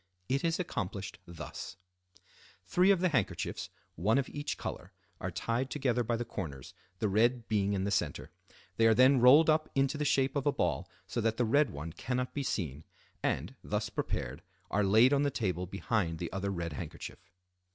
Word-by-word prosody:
It 135 +1 0
is 165 +1 +1
accomplished 100 - -4
thus:— 85 +2 -8 0.9
Three 180 +2 +3
of 195 -3 +4
the 185 - +3
handkerchiefs, 145 - -1 0.2
one 105 +9 +2
of 140 - +1
each 145 0 -4
color, - - -6 0.3
are - - -3
tied 120 +3 -1
together 125 -4 0
by 120 +1 0
the 120 +1 -3
corners, 70 - -6 0.2
the 105 - 0
red 115 +4 +2
being 100 -2 +1
in 95 -1 0
the 100 - -1
center. - - -1 0.5
They 115 - +5
are 110 - +5
then 130 +2 +6
rolled 140 +7 +8
up 155 0 +3
into 135 +2 +1
the - - +1
shape 135 -1 +2
of 140 0 0
a - - +5
ball - - -1 0.2
so 120 - -2
that 115 0 0
the 125 - +2
red 140 +4 +3
one 80 -2 -6
cannot 125 +5 -2
be 145 - -2
seen, 80 - -3 0.4
and, - - -1
thus - - -2
prepared, 65 +7 -3 0.3
are 105 - +2
laid 110 +7 +6
on 140 - +3
the 145 - +2
table 95 -9 -2
behind 90 -2 -1
the 85 0 -4
other 95 +1 -2
red 85 -4 -3
handkerchief. 70 - -7
115 Hz, 190 wpm, -31 LUFS, 95-135 Hz, 0.9 s, rolled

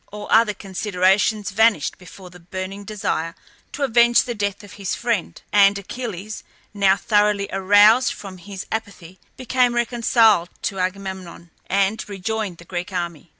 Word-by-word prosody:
All 210 0 -8
other 220 -2 +4
considerations 195 +2 0
vanished 215 -6 +2
before 180 0 -13
the 180 - -14
burning 185 +3 -7
desire 190 -5 -3 0.4
to 285 - -3
avenge 240 -2 +4
the 240 - -4
death 205 -1 -3
of 205 - -13
his 190 - -2
friend; 235 -7 -2
and 200 -1 +5
Achilles, 215 -1 -6 0.3
now 195 -2 +3
thoroughly 205 -1 +1
aroused 205 +6 +5
from 190 -3 -10
his 195 +1 -8
apathy, 195 -5 -6 0.2
became 250 -1 +1
reconciled 230 -6 +3
to 195 - -2
Agamemnon, 185 -2 -5 0.2
and 200 +2 0
rejoined 200 -1 -4
the 170 - -14
Greek 175 +2 -5
army. 170 -3 -5
200 Hz, 145 wpm, -21 LUFS, 185-220 Hz, 0.4 s, and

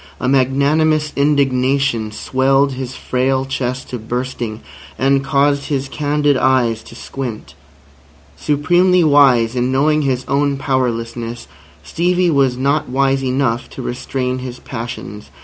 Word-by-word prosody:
A - - -2
magnanimous 145 +4 +2
indignation 135 -4 +1
swelled 135 +4 +1
his 130 -1 -6
frail 130 +1 -1
chest 130 -1 -4
to 125 - -4
bursting, 120 -1 -4 0.4
and 135 +1 +2
caused 140 0 +1
his 140 -2 -2
candid 145 0 0
eyes 125 -4 +2
to - - -12
squint. 125 -5 -6 0.8
Supremely 175 +5 +2
wise 130 -6 +4
in 125 +1 0
knowing 150 +3 +2
his 130 -3 -1
own 140 0 +1
powerlessness, 120 - -2 0.4
Stevie 180 +1 +1
was 135 -4 +2
not 140 +3 0
wise 135 +1 +1
enough 130 -2 -1
to 130 - -8
restrain 125 +1 -3
his 125 -1 -7
passions. 115 - -7
135 Hz, 125 wpm, -17 LUFS, 125-140 Hz, 0.8 s, wise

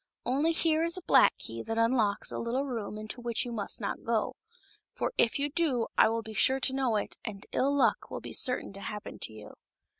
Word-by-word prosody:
Only 285 +6 +2
here 320 -1 +2
is 335 +2 0
a 370 - -7
black - - +5
key 115 0 -5
that 225 - -4
unlocks 230 -3 +2
a - - -4
little 250 +4 -1
room 225 -6 -4
into 215 +3 -7
which 235 -1 -1
you 240 - -5
must 215 -3 -2
not - - -4
go; 230 -2 0 0.6
for - - -2
if 230 - +3
you 285 +1 0
do 280 -8 +1
I - - +6
will 225 0 -2
be 220 0 -8
sure 260 +5 +4
to 265 - +2
know 265 -4 +1
it, 210 - -2
and 205 -3 -7
ill 275 +2 +1
luck 235 -6 +2
will - - -5
be - - -8
certain 250 -6 +1
to 195 - -10
happen 210 +1 -7
to - - -3
you." 110 -1 -11
235 Hz, 230 wpm, -30 LUFS, 215-270 Hz, 0.6 s, I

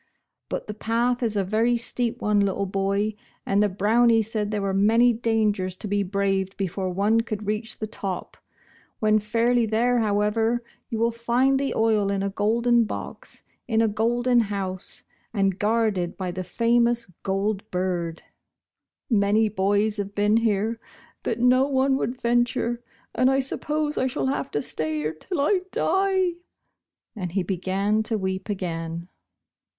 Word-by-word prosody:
"But - - -3
the 210 - -5
path 235 +3 0
is 225 -3 -1
a 200 - +1
very 225 +5 +2
steep 235 0 -2
one, 210 -1 +3
little 200 0 +1
boy, 195 +2 0 0.3
and 200 +1 +2
the 210 - +3
Brownie 225 +4 +3
said 210 -1 -2
there 210 -1 -1
were 195 -1 -1
many 225 +5 +4
dangers 215 -5 0
to 210 - -7
be 205 0 +1
braved 195 0 -1
before 190 -1 -2
one 205 +5 +2
could 215 -2 -5
reach 215 +3 -2
the 215 - -3
top. 195 -4 -5 0.6
\\Tien 215 0 +3
foiriy 230 +2 +1
there, 240 +3 +2
however, 220 +2 +1 0.3
you 225 - -3
will 230 +1 +2
find 240 +4 +2
the 275 0 -1
oil 220 -3 +2
in 195 -1 -1
a 200 - -1
golden 235 +4 +2
box, - - -8 0.2
in 225 -2 +1
a 225 - +4
golden 240 +3 +2
house, 195 -4 -3 0.3
and 195 -2 +1
guarded 210 -5 0
by 185 -3 -3
the 185 +1 -4
Yimous 235 +2 +1
Gold 195 +1 -1
Bird. 180 -2 -2 0.8
Many 215 -1 +3
bo\3 205 +2 +1
have 200 0 -4
been 210 +2 +3
here, 225 0 0 0.4
but 230 - -2
no 255 +2 +4
one 270 -1 +2
would 250 0 -3
venture, 240 0 +1 0.3
and 255 +2 +3
I 270 - +3
suppose 295 +3 -1
I 260 - +2
shall 260 - -2
have 265 0 -1
to 145 - -2
stay 155 +2 -3
here 155 +1 -2
till 345 - -5
I 370 +7 +3
die," 375 -1 +1 0.8
and 180 -5 -5
he 195 -1 +1
b^ran 195 +4 0
to 220 0 -1
weep 190 0 -3
again. 170 -3 -4
215 Hz, 160 wpm, -24 LUFS, 195-235 Hz, 0.8 s, many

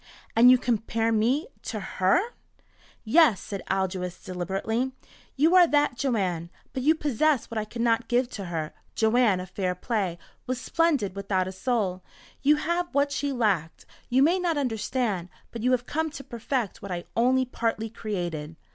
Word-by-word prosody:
"And 235 +2 +8
you 255 - +8
compare 230 -1 0
me 250 - +1
to - - -4
her?" - - +2 0.8
"Yes," 240 - +5
said 200 -2 -6
Aldous 185 -2 -2
deliberately. 195 +8 -2 0.4
"You 315 +6 +3
are 360 -2 +8
that 290 -4 +2
Joanne. 190 -10 -1 0.2
But 260 - -2
you 310 +5 +4
possess 295 -2 +1
what 225 - -1
I 215 - -3
could 230 +2 -4
not 230 -1 +2
give 245 +1 +2
to 200 - -6
her. 165 -3 -4 0.2
Joanne 220 -3 +3
of 180 0 -8
'Fair 185 -2 -1
Play' 190 -3 -2 0.3
was 255 -1 -2
splendid 280 - +1
without 195 -2 -1
a - - -4
soul. 190 -3 -1 0.4
You 295 +2 +5
have 345 +3 -1
what 285 0 +3
she 285 0 -1
lacked. 200 - 0 0.2
You 260 +2 +4
may 345 +5 +3
not 345 -3 0
understand, 225 -7 -1 0.2
but 230 - -6
you 250 - +2
have 250 -1 +1
come 320 +3 -1
to 280 -2 -9
perfect 235 -2 -3
what 200 - -7
I 175 -1 -3
only 255 +3 +3
partly 225 -2 -2
created." 175 -9 -4
230 Hz, 170 wpm, -26 LUFS, 190-270 Hz, 0.8 s, And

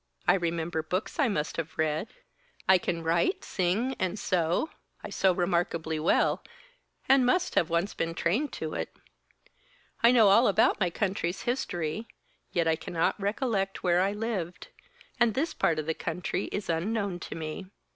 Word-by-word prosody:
I - - +7
remembered 165 -3 -2
books 185 - -2
I 280 - +4
must 155 -9 -2
have 165 -1 -4
read; 155 +4 0 0.6
I 190 -1 +6
can 170 -1 -2
write, 170 - +1
sing 200 +9 0
and 185 +2 -1
sew 180 - 0 0.3
I - - -7
sew 190 - +3
remarkably 170 -3 0
well, 155 - +2 0.7
and 270 0 +6
must 335 +9 +2
have 170 - +2
once 170 +4 0
been 165 0 -2
trained 235 - 0
to 155 -1 -4
it. 80 - -4 1.1
I 235 - +7
know 225 -5 +6
all 230 +5 +6
about 205 - +3
my 185 -4 +2
country's 185 -1 -2
history, 215 - -2 0.4
yet 170 -2 +1
I 160 0 +2
cannot 165 +4 -1
recollect 200 -2 -1
where 175 0 +3
I 195 +2 +2
lived, 205 - -4 0.5
and 235 -3 +3
this 310 +3 0
part 165 - +1
of 155 - -2
the 160 - 0
country 175 +2 -3
is 200 - -4
unknown 190 +2 -1
to - - -7
me. 160 +4 -5
180 Hz, 165 wpm, -28 LUFS, 165-215 Hz, 1.1 s, I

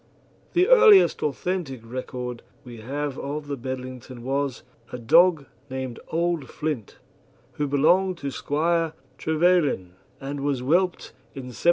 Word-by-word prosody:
The 360 +2 +4
earliest 445 -5 +7
authentic 150 -3 -2
record 125 0 -6 0.2
we 120 -2 -10
have 140 +5 -4
of 145 +2 -4
the 145 -1 -3
Bedlington 130 -1 -7
was 135 0 -2 0.3
a - - -5
dog 155 +6 +4 0.2
named 130 -2 -5
Old 170 -4 -1
Flint, 150 -9 -4 0.5
who 150 - -2
belonged 175 +7 +3
to 140 -4 -4
Squire 165 +4 0 0.3
Trevelyan, 160 - +2 0.3
and 140 +1 -5
was 140 -3 -1
whelped 175 +6 +1 0.2
in 130 -2 -7
1782. - - -12
140 Hz, 130 wpm, -25 LUFS, 130-170 Hz, 0.5 s, earliest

